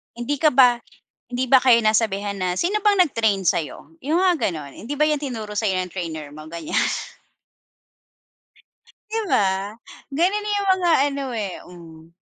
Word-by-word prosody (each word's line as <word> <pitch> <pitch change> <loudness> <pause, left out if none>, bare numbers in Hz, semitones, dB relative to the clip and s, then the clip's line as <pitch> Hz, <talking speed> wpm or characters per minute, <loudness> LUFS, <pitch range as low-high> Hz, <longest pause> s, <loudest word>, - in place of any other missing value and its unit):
Hindi 240 +5 -2
ka 310 +1 +3
ba 250 -2 +6 0.6
hindi 255 +1 -1
ba 260 0 +5
kayo 240 -3 +6
nasabihan 210 -2 +1
na, 185 -1 -2
"Sino 410 +4 0
bang 410 -2 +3
nag-train 220 - +2
sa'yo?" 165 - -2
Yung 315 +5 +1
nga 370 -2 +3
gano'n. 155 - -4
"Hindi 290 +5 -5
ba 305 - +4
yan 300 -1 -1
tinuro 220 -6 -5
sa'yo 195 -4 0
ng 180 - -2
trainer 160 -4 -5
mo?" 155 - -9
Ganiyan. 170 -2 -1 2.3
Di 450 +1 -1
ba? 195 +1 +1 0.4
Ganun 405 +7 0
yung 400 -1 -2
mga 355 -2 +1 0.2
ano 280 -1 -4
eh, 205 -5 -4
hmm. 165 -2 -14
230 Hz, 155 wpm, -22 LUFS, 185-300 Hz, 2.3 s, ba